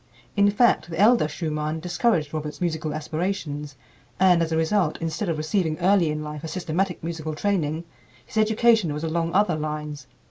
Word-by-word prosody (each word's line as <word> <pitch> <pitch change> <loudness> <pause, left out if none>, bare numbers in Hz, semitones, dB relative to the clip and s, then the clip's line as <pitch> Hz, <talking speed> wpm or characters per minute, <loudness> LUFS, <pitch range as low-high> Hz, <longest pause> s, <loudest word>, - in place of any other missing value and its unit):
In 200 0 +5
fact, 205 -7 +3
the 165 0 -5
elder 220 -4 +5
Schumann 155 0 -3
discouraged 175 -2 0
Robert's 150 -1 -4
musical 160 -3 -2
aspirations; 155 -2 -3 0.4
and 180 -2 +5
as 165 -1 -1
a 160 - +1
result, 160 0 +1
instead 165 +4 -2
of 165 - -1
receiving 155 0 0
early 180 -2 +3
in 150 0 -3
life 150 -1 -7
a - - -4
systematic 180 +2 -2
musical 160 -2 -4
training, 165 -4 -1 0.4
his - - -9
education 220 -5 +3
was 150 - -5
along 165 +1 -1
other 195 -4 +3
lines. 150 -2 -5
165 Hz, 170 wpm, -24 LUFS, 155-190 Hz, 0.4 s, In